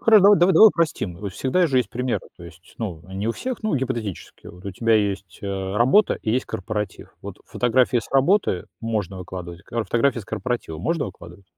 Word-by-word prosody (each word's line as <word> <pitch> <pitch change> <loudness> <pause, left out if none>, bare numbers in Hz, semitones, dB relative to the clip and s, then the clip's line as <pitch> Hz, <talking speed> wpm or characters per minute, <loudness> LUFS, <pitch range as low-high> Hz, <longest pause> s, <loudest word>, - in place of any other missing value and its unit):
Хоро 220 -2 +6
дава 200 +2 +7
давай 185 +5 +7
упростим. 155 - -1
Вот 100 +1 -6
всегда 155 - +1
же 135 -5 0
есть 125 - -1
примеры, 125 +1 -2
то 85 - -12
есть, 85 +1 -15
ну, 90 -8 -5
не 100 +3 -2
у - - +1
всех, 255 - -5
но 215 -6 0
гипотетически. 120 -7 -5
Вот 90 +1 -14
у 100 - -4
тебя 115 +4 +2
есть, 100 -3 -1
э, 95 0 -3
работа 130 - +4
и 110 - -1
есть 125 +3 +1
корпоратив. 105 -1 -5
Вот - - -8
фотографии 125 0 +2
с 110 - -7
работы 135 - +2 0.2
можно 105 -5 -3
выкладывать, 90 -1 -8
а 115 -1 -1
фотографии 120 +6 +1
с - - -12
корпоратива 120 -9 -4
можно 165 - -1
выкладывать? 95 0 -12
115 Hz, 195 wpm, -23 LUFS, 95-130 Hz, 0.2 s, дава